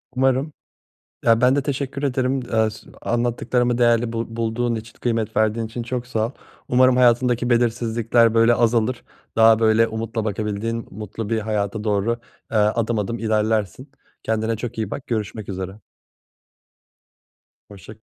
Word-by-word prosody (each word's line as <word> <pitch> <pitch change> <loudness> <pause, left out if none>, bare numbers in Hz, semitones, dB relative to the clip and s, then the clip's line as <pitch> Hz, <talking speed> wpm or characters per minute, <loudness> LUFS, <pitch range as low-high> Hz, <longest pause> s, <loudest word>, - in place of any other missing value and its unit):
Umarım. 135 +3 +1 0.7
Ya, 115 0 +4
ben 125 +1 +5
de 145 - +2
teşekkür 140 0 -3
ederim, 130 -1 0
eee, 110 -1 +3
s 110 - -13
anlattıklarımı 120 +1 0
değerli 120 -1 +3
bul 115 0 -2
bulduğun 115 +1 -1
için, 110 0 -8
kıymet 115 -3 -1
verdiğin 110 +1 +1
için 120 +2 -5
çok 125 +1 -4
sağ 110 -3 0
ol. - - -9 0.4
Umarım 130 0 +4
hayatındaki 120 0 +3
belirsizlikler, 115 -1 +2
böyle, 115 +1 +5
azalır. 120 +1 +1 0.3
Daha, 110 0 +6
böyle, 110 0 +4
umutla 115 0 -3
bakabildiğin 110 +2 -3
mutlu 105 +1 -6
bir 115 -1 +1
hayata 105 -1 -2
doğru, 105 +2 0 0.3
eee, 110 - +1
adım 110 +2 +1
adım 115 +3 -3
ilerlersin. 110 - -1 0.3
Kendine 110 0 0
çok 120 +1 -6
iyi 110 -3 -3
bak, 135 - -6
görüşmek 110 -2 -3
üzere. 95 +1 -5 1.9
Hoşça 100 +1 -12
115 Hz, 140 wpm, -22 LUFS, 110-120 Hz, 1.9 s, Daha